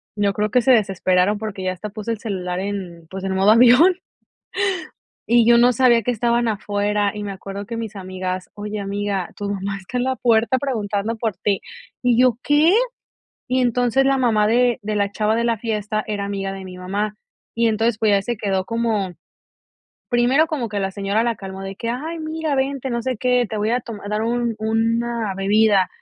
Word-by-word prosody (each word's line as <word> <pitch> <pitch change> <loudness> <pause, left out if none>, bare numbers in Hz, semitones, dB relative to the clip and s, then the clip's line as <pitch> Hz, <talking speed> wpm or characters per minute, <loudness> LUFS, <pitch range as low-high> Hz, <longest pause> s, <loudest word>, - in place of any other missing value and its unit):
yo 205 -1 +1
creo 210 +1 -1
que 250 +2 +4
se 260 - +3
desesperaron 195 -2 +2
porque 205 -3 -5
ya 185 0 -1
hasta 210 +4 -7
puse 215 +2 -5
el 220 - -3
celular 185 -5 -3
en, 185 -5 -5
pues, 190 0 -7
en 190 0 -1
modo 195 +2 +4
avión, 250 +11 +6 1.3
y 235 -1 +5
yo 235 - +7
no 245 +1 +5
sabía 240 -1 +4
que 245 - 0
estaban 235 +1 +1
afuera, 205 -1 0
y 210 - -5
me 200 - -4
acuerdo 195 +1 -7
que 230 +3 -6
mis 225 -2 -5
amigas: 185 -1 -5
"Oye 210 0 -5
amiga, 200 -2 -2
tu 205 -1 -4
mamá 200 0 -3
está 195 +6 -6
en 245 - +1
la 260 0 0
puerta 235 +1 +3
preguntando 220 -4 -2
por 220 -3 -2
ti", 200 -2 0 0.4
y 245 -1 +3
yo: 250 -3 +4
"¿Qué?" 300 +4 +4 0.8
Y 255 +1 +1
entonces 245 +2 +2
la 270 0 +3
mamá 220 -5 +2
de 240 +1 +2
de 210 0 -2
la 200 -1 0
chava 215 +1 0
de 235 - 0
la 230 -1 +1
fiesta, 215 -2 -2
era 205 -2 -2
amiga 195 -1 -3
de 195 -1 -8
mi 180 -1 -9
mamá, 200 +4 -3 0.4
y 230 0 +2
entonces 225 +1 +1
pues 220 - +2
ya 200 -1 +3
se 240 +3 -2
quedó 195 -3 -1
como, 225 -5 -1 1.0
primero 250 +6 +3
como 290 -8 -3
que 205 - -2
la 195 0 -1
señora 200 +3 0
la 235 -1 +1
calmó 195 0 -8
de 195 0 -6
que: 230 +2 -3
"Ay 310 +7 -4
mira 315 -1 -2
vente, 270 0 -1
no 235 -1 -2
sé 255 +1 -2
qué, 250 0 +2
te 215 - -4
voy 215 +2 0
a 245 - +1
tom 225 -3 -8
a 205 - -7
dar 210 +1 -1
un 235 0 0
una 225 -1 0
bebida". 200 -1 +3
215 Hz, 210 wpm, -21 LUFS, 200-240 Hz, 1.3 s, yo